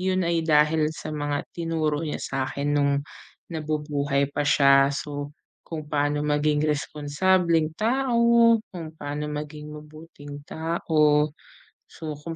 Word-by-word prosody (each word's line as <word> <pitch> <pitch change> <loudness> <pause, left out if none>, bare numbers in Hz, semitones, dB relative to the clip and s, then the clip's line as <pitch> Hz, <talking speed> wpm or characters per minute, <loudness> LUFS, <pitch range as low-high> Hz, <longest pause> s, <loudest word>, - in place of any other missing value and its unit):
'yon 185 -1 +1
ay 170 0 +1
dahil 155 0 +3
sa 155 0 -7
mga 145 -1 -2
tinuro 160 -3 -1
niya 155 -2 -3
sa 135 -1 -3
'kin 145 +2 -2
no'ng 140 -1 +1 0.5
nabubuhay 150 -3 -1
pa 145 0 0
siya. 140 -1 +5
So 145 +1 -5 0.4
kung 155 -2 -5
paano 145 0 0
maging 150 +1 +1
responsableng 155 +3 +1
tao, 235 +1 +3
kung 165 -4 -8
paano 150 -1 -5
maging 150 0 -6
mabuting 150 -1 -11
tao, 155 -2 +1 0.6
so 160 -1 -7
kung 165 +2 -6
150 Hz, 125 wpm, -25 LUFS, 145-165 Hz, 0.6 s, siya